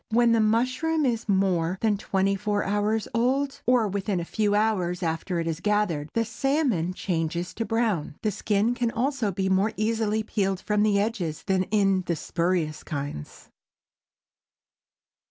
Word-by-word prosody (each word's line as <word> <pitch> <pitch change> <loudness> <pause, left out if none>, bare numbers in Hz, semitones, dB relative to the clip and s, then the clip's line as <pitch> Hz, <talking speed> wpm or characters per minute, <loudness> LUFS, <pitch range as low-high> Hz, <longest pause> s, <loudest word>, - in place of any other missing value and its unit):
When 235 +1 +4
the 230 - +4
mushroom 255 +8 +1
is 235 -3 -1
more 185 -3 +1
than 220 -2 +2
twenty 195 -1 0
four 205 +1 -1
hours 210 +2 0
old, 265 +4 0
or 245 -3 +4
within 195 -1 -1
a 170 - -4
few 205 +2 0
hours 190 -5 0
after 165 +2 -2
it 165 - -2
is 165 -1 -2
gathered, 190 -7 0
the 230 0 +1
salmon 240 - 0
changes 170 -1 -2
to 230 - -3
brown. 220 -11 -1
The 215 - +1
skin 205 +3 +1
can 245 -1 0
also 245 -2 -1
be 190 +1 -1
more 195 +3 +2
easily 220 0 0
peeled 195 -3 -1
from 210 +2 0
the 210 -1 +3
edges 200 -8 -2
than 190 -1 +1
in 195 -2 +2
the 170 - +1
spurious 165 -1 -1
kinds. 140 - -6
205 Hz, 155 wpm, -26 LUFS, 180-225 Hz, -, When